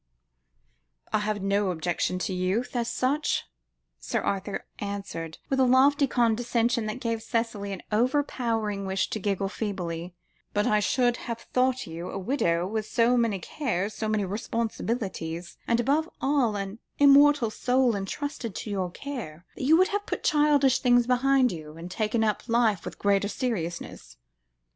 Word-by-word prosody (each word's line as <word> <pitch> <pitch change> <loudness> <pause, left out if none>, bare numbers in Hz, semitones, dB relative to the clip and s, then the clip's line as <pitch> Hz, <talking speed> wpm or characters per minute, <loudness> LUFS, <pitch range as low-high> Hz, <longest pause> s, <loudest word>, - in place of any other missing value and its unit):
"I 215 - +3
have 210 -1 -2
no 200 0 +1
objection 175 +1 -1
to 190 - -2
youth, 190 +8 -1
as 235 -1 0
such," 285 +4 0 0.5
Sir 60 - -2
Arthur 195 0 -3
answered, 195 -6 -5
with 270 - 0
a - - +6
lofty 275 +3 +5
condescension 235 -1 +1
that 215 +4 -4
gave 230 -2 -2
Cicely 225 -3 -2
an 190 - -6
overpowering 225 -4 0
wish 190 0 -1
to 215 - -2
giggle 195 -1 -1
feebly; 180 -4 -4 0.4
"but 205 0 +2
I 210 - +3
should 245 +3 +2
have 235 -1 -5 0.2
thought 255 0 +2
you, 165 +1 -6
a - - -5
widow, 180 -6 0
with 215 +2 -3
so 235 +1 +3
many 230 -4 +2
cares, 210 - -2
so 220 0 -3
many 215 -2 +1
responsibilities, 200 -5 -3
and 235 0 +2
above 290 +7 +1
all 265 -5 +2
with 205 - -2
an 195 +3 -9 0.2
immortal 285 -4 +6
soul 250 0 +2
entrusted 225 +2 -4
to 215 - -5
your 190 -3 -1
care, 185 - -7
that - - -4
you 315 +4 +6
would 370 +3 +4
have 410 0 -2
put - - -3
childish 295 -3 +4
things 245 -1 +4
behind 255 +1 +3
you, 155 -2 -8
and 170 +2 -8
taken 220 +2 0
up 215 +2 -1
life 225 -6 +2
with - - -7
greater 200 0 +2
seriousness." 170 - -4
220 Hz, 160 wpm, -27 LUFS, 195-250 Hz, 0.5 s, a